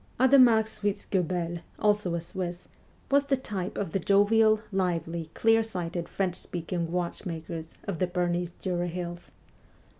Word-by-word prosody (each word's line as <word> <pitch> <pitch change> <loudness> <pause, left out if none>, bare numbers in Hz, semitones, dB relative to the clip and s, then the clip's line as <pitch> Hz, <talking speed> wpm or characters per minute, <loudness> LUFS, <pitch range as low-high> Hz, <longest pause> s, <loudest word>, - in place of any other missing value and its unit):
Adhemar 255 -4 +7
Schwitzguebel, 185 -5 -2 0.2
also 205 -4 +2
a 170 - -2
Swiss, 175 0 -5 0.4
was 280 0 +4
the 275 -1 +2
type 200 -7 -4
of 195 -5 -2
the 195 - 0
jovial, 215 +3 +4
lively, 170 -3 -1
clear 225 0 +4
sighted 175 -5 -4
French 190 -2 -1
speaking 170 -1 -4
watchmakers 170 -2 -4
of 185 -5 -4
the 185 - +2
Bernese 175 -1 -1
Jura 175 -2 -1
hills. 175 0 -5
180 Hz, 130 wpm, -28 LUFS, 170-210 Hz, 0.4 s, Adhemar